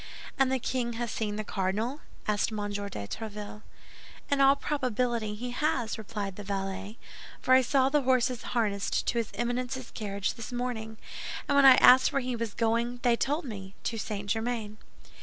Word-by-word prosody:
"And 265 -1 +4
the 265 - +2
king 245 -1 -2
has 235 0 -3
seen 210 -2 -2
the 215 - -3
cardinal?" 210 +8 -1 0.3
asked 210 +1 +1
M. - - -4 0.2
de 205 0 -3
Tréville. 210 - -6 0.7
"In 280 -1 +3
all 275 0 +7
probability 245 -6 -1
he 245 +3 -5
has," 245 -4 0
replied 205 -3 -5
the 205 - -6
valet, 195 +1 -4 0.4
"for 255 - +3
I 260 - +8
saw 265 +1 +3
the 295 +2 +3
horses 255 -2 +2 0.2
harnessed 200 -3 0
to 235 - +1
his 225 - -2
Eminence's 245 +2 -2
carriage 200 -2 -2
this 230 +1 -8
morning, 240 -3 -3 0.5
and 285 - +2
when 280 -1 +6
I 260 - +10
asked 255 +1 +7
where 275 - +1
he 250 -1 -2
was 230 -2 -4
going, 235 +1 0
they 240 -2 +4
told 290 +6 -1
me, 195 -5 -7
'To 225 - -2
St. 205 -1 -4
Germain. 220 -1 -2
230 Hz, 175 wpm, -29 LUFS, 210-255 Hz, 0.7 s, I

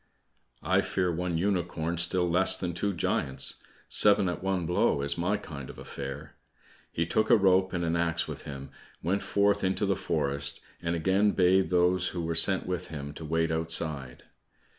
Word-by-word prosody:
"I - - +2
fear 90 -2 -1
one 85 0 -2
unicorn 85 -3 -1
still 90 +1 +1
less 90 +3 +4
than 90 -2 -3
two 100 +4 -1
giants. 65 -6 -1 0.3
Seven 100 -2 +4
at 90 - -4
one 95 -2 -1
blow, 80 -4 +1
is 70 0 0
my 90 +5 0
kind 70 -9 -9
of - - -10
affair." 70 +2 -8 0.5
He 85 - -1
took 110 +6 0
a - - +7
rope 95 -1 +3
and 85 -2 -2
an 85 0 0
axe 85 -1 0
with - - -7
him, 70 -1 -8 0.3
went 95 +5 0
forth 100 0 +1
into 95 +2 0
the 100 -1 +1
forest, 70 -4 -1 0.2
and 85 0 -1
again 95 +5 +2
bade 95 +1 +3
those 90 0 +2
who 85 -2 -4
were 85 0 -2
sent 95 +3 +4
with 90 -2 -3
him 70 -2 -7
to 80 - -9
wait 80 +1 0
outside. 80 -5 -1
85 Hz, 180 wpm, -28 LUFS, 80-95 Hz, 0.5 s, a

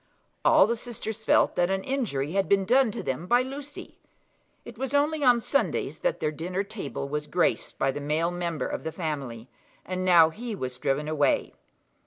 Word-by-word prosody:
All - - +6
the 235 +3 0
sisters 225 -2 -5
felt - - +3
that 175 0 +2
an 190 0 -1
injury 190 - -2
had 195 +1 0
been 195 -1 +3
done 255 +3 +4
to 220 - -5
them 135 +7 -3
by 245 +3 +4
Lucy. 280 +2 -9 0.7
It - - -10
was 265 +1 -3
only 295 +1 +2
on 245 -2 +5
Sundays 280 +5 -1
that - - -1
their 150 - 0
dinner 180 +5 -3
table 195 -9 -6
was 150 +1 -3
graced 175 -1 0
by 135 - +1
the 145 +2 -6
male 155 +4 0
member 170 -3 -3
of - - -4
the 160 - -3
family, 140 -9 -5 0.4
and 185 0 -3
now 170 -3 +6
he 230 +4 -6
was 125 -7 -5
driven 140 +4 -1
away. 150 -2 +1
185 Hz, 190 wpm, -27 LUFS, 150-240 Hz, 0.7 s, All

